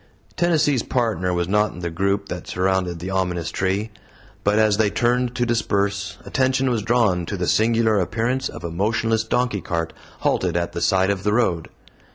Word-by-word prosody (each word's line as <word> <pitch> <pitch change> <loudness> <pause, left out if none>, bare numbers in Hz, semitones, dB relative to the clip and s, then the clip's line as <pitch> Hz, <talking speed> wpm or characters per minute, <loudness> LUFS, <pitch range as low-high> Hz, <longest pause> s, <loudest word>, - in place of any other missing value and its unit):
Tennessee's 150 -7 +2
Partner 110 -9 0
was 85 -1 0
not 105 +1 +2
in 90 - -9
the 85 -1 -3
group 100 +3 0
that 90 -1 -6
surrounded 90 -1 0
the 90 +3 -5
ominous 90 -3 -1
tree. 100 +3 -1 0.5
But 105 +1 +2
as 110 -2 +3
they 110 -1 +3
turned 120 +3 +1
to 120 -1 +1
disperse 100 -4 -1
attention 130 0 +1
was 115 -3 0
drawn 105 -7 +1
to 100 - -3
the 90 - -1
singular 110 +1 +3
appearance 115 +8 -1
of - - -9
a 85 - -4
motionless 110 +5 0
donkey 115 -2 0
cart 85 -1 -3 0.3
halted 90 -2 +1
at 85 0 -1
the 85 - -5
side 95 +1 +3
of 100 -2 -2
the 105 +1 0
road. 90 -8 +1
100 Hz, 185 wpm, -22 LUFS, 90-115 Hz, 0.5 s, as